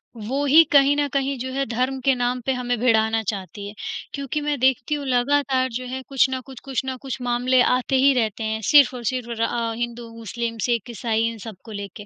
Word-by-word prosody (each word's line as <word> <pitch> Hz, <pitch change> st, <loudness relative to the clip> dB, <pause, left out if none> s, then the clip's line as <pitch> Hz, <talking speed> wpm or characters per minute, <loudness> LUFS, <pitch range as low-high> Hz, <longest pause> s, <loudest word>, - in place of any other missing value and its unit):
वो 240 Hz, +6 st, -3 dB
ही 305 Hz, +4 st, +7 dB
कहीं 280 Hz, 0 st, +5 dB
न 290 Hz, 0 st, +1 dB
कहीं 275 Hz, 0 st, 0 dB
जो 260 Hz, +2 st, -4 dB
है 275 Hz, +1 st, 0 dB
धर्म 255 Hz, +3 st, -1 dB
के 270 Hz, -, +5 dB
नाम 245 Hz, 0 st, -1 dB
पे 265 Hz, -, +1 dB
हमें 245 Hz, -1 st, -2 dB
भिड़ाना 225 Hz, -2 st, +2 dB
चाहती 200 Hz, 0 st, -6 dB
है। 205 Hz, -, -8 dB, 0.4 s
क्योंकि 280 Hz, +1 st, -3 dB
मैं 295 Hz, -1 st, -1 dB
देखती 260 Hz, +2 st, +2 dB
हूँ 290 Hz, -1 st, -5 dB
लगातार 260 Hz, +1 st, +1 dB
जो 255 Hz, -, -7 dB
है 260 Hz, +1 st, -5 dB
कुछ 270 Hz, -1 st, +3 dB
ना 260 Hz, 0 st, -2 dB
कुछ, 260 Hz, -1 st, -12 dB
कुछ 270 Hz, -1 st, -2 dB
ना 260 Hz, 0 st, -3 dB
कुछ 265 Hz, -1 st, -5 dB
मामले 245 Hz, +1 st, +2 dB
आते 255 Hz, +2 st, +2 dB
ही 270 Hz, +1 st, +5 dB
रहते 225 Hz, -3 st, -1 dB
हैं 220 Hz, 0 st, -2 dB
सिर्फ 285 Hz, -3 st, +7 dB
और 245 Hz, -1 st, -7 dB
सिर्फ 250 Hz, -2 st, -4 dB
र -, -, -1 dB
अ, 230 Hz, 0 st, -1 dB
हिंदू, 240 Hz, 0 st, -4 dB
मुस्लिम, 230 Hz, +1 st, -4 dB
सिख, 235 Hz, -1 st, -1 dB
ईसाई 225 Hz, 0 st, -1 dB
इन 230 Hz, -, -8 dB
सब 220 Hz, -, -7 dB
को 225 Hz, -, -11 dB
लेके। 200 Hz, 0 st, -7 dB
250 Hz, 230 wpm, -23 LUFS, 230-270 Hz, 0.4 s, ही